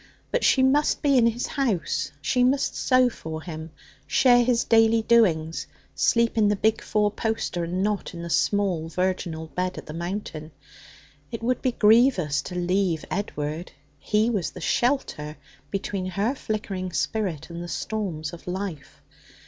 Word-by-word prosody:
But - - 0
she 260 - +4
must 285 +3 +2
be 280 -2 +4
in 235 -2 +5
his 235 +1 -1
house; 235 - -1
she 250 - +2
must 270 +2 +1
sew 255 -1 +4
for 160 -9 -6
him, 160 -2 -7 0.4
share 245 -2 +5
his 240 -1 +2
daily 225 0 +4
doings, 170 -9 +2 0.3
sleep 230 -1 +2
in 210 - +4
the 205 - +2
big 215 +2 +1
four 210 -1 +1
poster, 210 -6 -2
and 180 +3 -2
not 205 -3 -2
in 170 - -6
the 170 - -5
small 185 -6 +1
virginal 175 -2 -2
bed 180 +2 -3
at - - -7
the 150 - -8
Mountain. 170 -3 -5 0.8
It 230 -1 -6
would 250 +1 0
be 255 -2 0
grievous 210 - +4
to 180 - -6
leave 180 -2 0
Edward. 160 -4 -4 0.3
He 215 +7 +1
was 200 -7 -1
the - - -11
shelter 240 - -1 0.3
between 195 -1 -3
her 200 +7 0
flickering 200 -7 -4
spirit 175 -9 -2
and 170 0 -6
the - - -6
storms 170 -3 -3
of 170 - -11
life. 180 -5 -6
200 Hz, 160 wpm, -25 LUFS, 170-230 Hz, 0.8 s, in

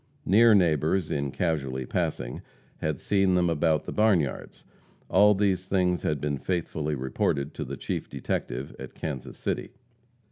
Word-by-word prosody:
Near 110 +4 +6
neighbors, 80 -1 +2
in 70 -1 -1
casually 70 -6 -2
passing, - - -2 0.4
had 75 -4 -2
seen 95 -2 +2
them 90 -1 +2
about 80 -1 +1
the - - -5
barnyards. 95 - 0 0.5
All 105 +3 +6
these 95 -2 +1
things 90 -2 +1
had 75 -2 -1
been 70 -1 -2
faithfully 80 -4 -2
reported 70 +2 -1
to 75 - -4
the 70 +1 -6
chief - - -4
detective 65 +3 -4
at - - -9
Kansas 65 -4 -5
City. - - -3
80 Hz, 145 wpm, -27 LUFS, 70-95 Hz, 0.5 s, Near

